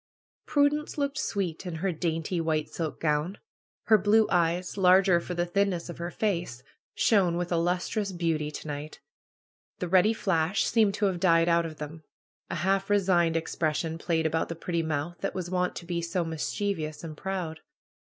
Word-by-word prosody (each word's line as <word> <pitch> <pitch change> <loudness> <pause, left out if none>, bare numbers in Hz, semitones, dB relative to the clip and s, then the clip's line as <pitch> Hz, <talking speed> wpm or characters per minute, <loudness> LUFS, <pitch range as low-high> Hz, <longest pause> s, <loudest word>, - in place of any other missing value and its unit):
Prudence 295 +1 +1
looked 280 0 -1
sweet 185 -6 -2
in 175 - -4
her 185 +4 -1
dainty 165 +1 -2
white 155 -2 0
silk 160 -3 -4
gown. 155 +4 0 0.5
Her 215 -1 +5
blue 210 +3 +4
eyes, 175 +1 +1
larger 185 -1 +5
for 180 +1 -5
the 175 0 0
thinness 180 -1 0
of 170 - -8
her 170 0 -3
face, 175 - -2 0.3
shone 185 -6 +3
with 175 0 -3
a 170 - +2
lustrous 180 +4 0
beauty 165 -4 -1
to 150 - -8
night. 145 +1 -6 0.8
The 180 - -3
ready 190 +5 +4
fiash 185 -2 +1
seemed 215 -4 +3
to 210 - 0
have 185 -3 0
died 165 -2 +4
out 170 -1 +3
of 155 -1 -10
them. 155 +2 -7 0.5
A - - -3
half 195 +2 0
resigned 180 -5 +3
expression 160 0 -2
played 165 -1 0
about 160 +1 0
the 170 - -4
pretty 170 +1 -2
mouth 160 +2 -3
that 195 - -3
was 180 -1 -4
wont 180 -1 0
to 175 - -7
be 170 -1 -2
so 170 +1 -1
mischievous 160 -1 -3
and 160 -2 -6
proud. 175 -2 -4
175 Hz, 180 wpm, -28 LUFS, 160-195 Hz, 0.8 s, Her